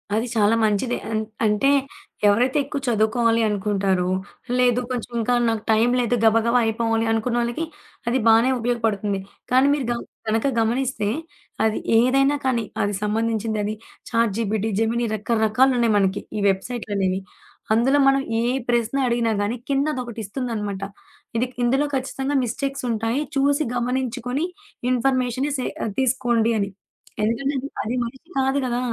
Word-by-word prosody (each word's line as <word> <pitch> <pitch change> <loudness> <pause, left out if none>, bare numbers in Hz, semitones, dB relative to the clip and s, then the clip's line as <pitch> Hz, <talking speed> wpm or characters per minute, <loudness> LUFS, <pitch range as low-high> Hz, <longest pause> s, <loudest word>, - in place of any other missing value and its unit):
అది 225 +3 0
చాలా 215 0 +4
మంచిదే. 220 +3 +1
అన్ 215 - 0 0.2
అంటే 210 +6 +3 0.6
ఎవరైతే 245 +7 +3
ఎక్కువ 280 +1 -4
చదువుకోవాలి 230 +1 +2
అనుకుంటారో 195 -3 0 0.5
లేదు 245 -1 +4
కొంచెం 245 -1 -4
ఇంకా 230 +2 +1
నాకు 225 -2 -1
టైం 220 +2 +4
లేదు 245 0 +1
గబగబా 230 +2 +4
అయిపోవాలి 225 0 0
అనుకున్న 230 +2 0
వాళ్ళకి 240 +7 -2 0.4
అది 245 +2 +2
బానే 225 +3 +6
ఉపయోగపడుతుంది. 225 -4 0 0.3
కానీ 260 +2 +5
మీరు 285 -3 -1
గ - - 0 0.3
గనక 220 +4 +1
గమనిస్తే 240 -1 0 0.6
అది 220 -1 +1 0.2
ఏదైనా 275 +3 +3
కానీ 245 -3 +1 0.2
అది 205 +1 0
సంబంధించిందది 215 -1 -1 0.4
చాట్‌జీపీటీ, 220 -2 0
జెమిని 230 +2 +1
రకరకాలున్నాయి 230 +2 +2
మనకి 195 0 +1 0.2
ఈ - - -1
వెబ్‌సైట్‌లనేవి. 195 -2 -1 0.5
అందులో 250 +6 +3
మనం 275 0 +4 0.2
ఏ - - 0 0.3
ప్రశ్న 240 +1 +1
అడిగినా 235 -1 +1
గానీ 205 +4 -1
కింద 275 0 +2
అదొకటి 240 -3 -5
ఇస్తుందనమాట. 210 -3 -4 0.5
ఇది 235 +2 +2 0.2
ఇందులో 265 +4 +2
ఖచ్చితంగా 270 +1 -2
మిస్టేక్స్ 275 +4 -3
ఉంటాయి. 225 +3 0 0.2
చూసి 285 +2 +2
గమనించుకొని 250 +3 -1 0.5
ఇన్ఫర్మేషనే 255 +2 +1
సే 255 - -1 0.3
తీసుకోండి 240 -3 +2
అని 200 -1 -1 0.5
ఎందుకంటే, 245 +6 0
అది - - -3
అది 235 +4 -2
మనిషి 265 +8 -9
కాదు 270 +1 +2
గదా! 245 -1 -1
235 Hz, 135 wpm, -23 LUFS, 220-255 Hz, 0.6 s, బానే